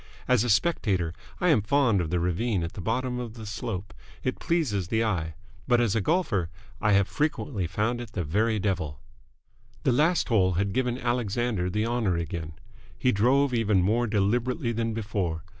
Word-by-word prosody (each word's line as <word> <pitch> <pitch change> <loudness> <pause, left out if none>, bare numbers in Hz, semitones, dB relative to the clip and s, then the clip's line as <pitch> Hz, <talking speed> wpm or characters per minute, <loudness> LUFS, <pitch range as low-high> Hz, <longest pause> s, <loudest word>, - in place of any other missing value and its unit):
As 125 -4 +4
a 120 - -1
spectator, 100 - +1 0.3
I 180 - +2
am 145 -9 +5
fond 115 -3 +2
of 80 - -3
the 90 +1 0
ravine 90 +3 0
at 85 - -4
the - - -6
bottom 125 +5 -1
of 120 -2 -6
the 110 -2 -8
slope. 105 -1 -5 0.3
It 130 - -2
pleases 120 - 0
the 110 +3 +1
eye. 85 -8 -1 0.3
But, 120 -2 +4
as 115 -4 +2
a 110 - +2
golfer, 105 - +1 0.3
I 105 -1 +3
have 100 0 +4
frequently 145 - -1
found 110 +7 -1
it 115 -4 -9
the 90 - -1
very 110 +8 +1
devil. 90 -9 -2 0.8
The - - +3
last 155 +7 +2
hole 95 -6 +3
had 95 +2 0
given 125 -1 0
Alexander 120 -5 -1
the 105 +4 0
honour 115 -7 0
again. 80 -1 -4 0.4
He 125 - +2
drove 125 +6 +3
even 105 -5 +2
more 115 +5 +2
deliberately 115 +6 0
than 115 -1 -2
before. 100 -7 -2
110 Hz, 180 wpm, -27 LUFS, 95-120 Hz, 0.8 s, am